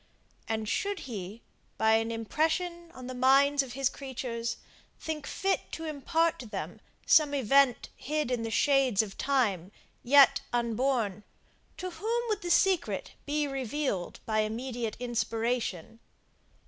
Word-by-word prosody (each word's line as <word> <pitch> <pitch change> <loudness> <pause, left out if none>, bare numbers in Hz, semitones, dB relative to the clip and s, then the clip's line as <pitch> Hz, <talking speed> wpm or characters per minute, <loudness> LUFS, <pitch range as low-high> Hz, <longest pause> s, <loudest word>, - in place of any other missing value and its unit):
And 220 -1 -2
should 400 - -1
he, 210 -2 -7 0.3
by 220 0 +3
an 225 +1 +2
impression 330 - -1
on 255 - -10
the 255 - -5
minds 275 +3 +4
of 260 -3 -7
his 270 0 +1
creatures, 245 -4 -4 0.4
think 310 -3 -5
fit 390 0 -1
to 325 - -5
impart 320 +2 0
to 245 - -8
them 205 -2 -6 0.2
some 295 -2 +5
event 270 0 +3
hid 300 -2 -2
in 245 -2 0
the 225 - -3
shades 265 -4 +3
of 200 -2 -8
time, 210 -10 0 0.3
yet 275 +1 +6
unborn, 235 -3 0 0.5
to 370 0 -5
whom 450 +8 -1
would 420 -1 -1
the 350 - -4
secret 370 0 +2 0.2
be 295 +1 +1
revealed 270 -7 -3
by 215 -1 0
immediate 230 +1 -3
inspiration? 230 -4 -2
260 Hz, 135 wpm, -29 LUFS, 225-300 Hz, 0.5 s, yet